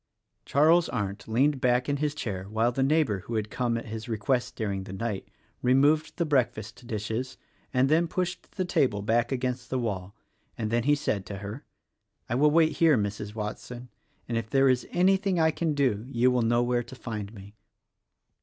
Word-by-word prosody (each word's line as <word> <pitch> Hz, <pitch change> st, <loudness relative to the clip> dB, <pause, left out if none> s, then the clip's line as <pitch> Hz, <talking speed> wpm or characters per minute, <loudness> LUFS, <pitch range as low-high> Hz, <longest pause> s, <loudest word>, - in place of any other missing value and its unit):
Charles 160 Hz, +4 st, +4 dB
Arndt 100 Hz, -3 st, -3 dB
leaned 130 Hz, +5 st, +2 dB
back 125 Hz, 0 st, +2 dB
in 145 Hz, 0 st, 0 dB
his 150 Hz, 0 st, -1 dB
chair 95 Hz, -8 st, -4 dB
while 110 Hz, +4 st, +1 dB
the 135 Hz, -, -2 dB
neigh 155 Hz, +4 st, +4 dB
bor 105 Hz, -8 st, -2 dB
who 115 Hz, +5 st, -6 dB
had 105 Hz, -1 st, -2 dB
come, 120 Hz, -2 st, 0 dB
at 115 Hz, -, -6 dB
his 110 Hz, +1 st, -6 dB
request 115 Hz, +3 st, -1 dB
during 100 Hz, -4 st, -3 dB
the 95 Hz, -, -8 dB
night, 100 Hz, 0 st, -3 dB, 0.3 s
removed 145 Hz, +6 st, +3 dB
the 170 Hz, -, +1 dB
breakfast 125 Hz, -4 st, -1 dB
dishes 115 Hz, +3 st, -3 dB, 0.3 s
and 130 Hz, 0 st, +3 dB
then 165 Hz, +4 st, +3 dB
pushed 180 Hz, +1 st, -3 dB
the 185 Hz, -, -2 dB
table 120 Hz, -, +1 dB
back 120 Hz, +3 st, +1 dB
against 125 Hz, -1 st, -2 dB
the 130 Hz, -, -1 dB
wall; 100 Hz, -5 st, -3 dB, 0.4 s
and 110 Hz, -1 st, -2 dB
then 120 Hz, +1 st, +1 dB
he 145 Hz, +1 st, +4 dB
said 125 Hz, -9 st, -1 dB
to 100 Hz, -, -6 dB
her, 105 Hz, +6 st, -7 dB, 0.6 s
"I -, -, -2 dB
will 145 Hz, +5 st, +4 dB
wait 160 Hz, +1 st, +3 dB
here, 160 Hz, -5 st, +5 dB
Mrs. 105 Hz, 0 st, -3 dB
Watson, 120 Hz, +3 st, -6 dB, 0.4 s
and 115 Hz, -1 st, 0 dB
if 110 Hz, -, -7 dB
there 135 Hz, +2 st, +4 dB
is 125 Hz, -2 st, +1 dB
anything 190 Hz, 0 st, +2 dB
I 160 Hz, 0 st, +4 dB
can 160 Hz, -1 st, -1 dB
do 125 Hz, -7 st, +1 dB
you 125 Hz, 0 st, +3 dB
will 125 Hz, -1 st, +2 dB
know 120 Hz, +1 st, +2 dB
where 120 Hz, 0 st, +1 dB
to 125 Hz, -, -10 dB
find 105 Hz, -5 st, -6 dB
me." 100 Hz, 0 st, -12 dB
125 Hz, 195 wpm, -27 LUFS, 110-145 Hz, 0.6 s, here